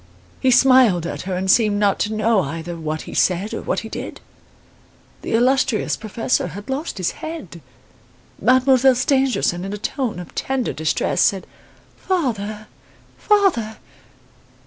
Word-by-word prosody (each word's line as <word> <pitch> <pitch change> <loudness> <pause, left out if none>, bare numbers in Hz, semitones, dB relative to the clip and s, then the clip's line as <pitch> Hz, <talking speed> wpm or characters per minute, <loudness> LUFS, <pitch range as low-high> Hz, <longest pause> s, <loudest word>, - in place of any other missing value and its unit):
He 260 - +2
smiled 250 -8 +5
at - - -4
her 185 - -1
and 185 +1 -2
seemed 210 -2 +3
not 205 -1 +1
to 210 - -1
know 220 -1 +2
either 165 +2 -5
what 155 -1 -4
he - - -10
said 185 +3 +1
or - - -4
what - - -2
he 225 - -8
did. - - -7 1.0
The - - -4
illustrious 255 0 +2
professor 225 +3 -2
had 205 +6 -8
lost 285 +1 -4
his 185 -2 -1
head. 305 - -7 0.8
Mademoiselle 260 0 +4
Stangerson 255 -9 +1
in 195 +1 -5
a - - -4
tone 245 +2 -3
of 180 -1 -9
tender 265 -2 -2
distress 155 0 0
said: 195 -2 +2 0.6
'Father! 215 - -2 0.5
father! 375 - +1
220 Hz, 145 wpm, -20 LUFS, 190-260 Hz, 1.0 s, smiled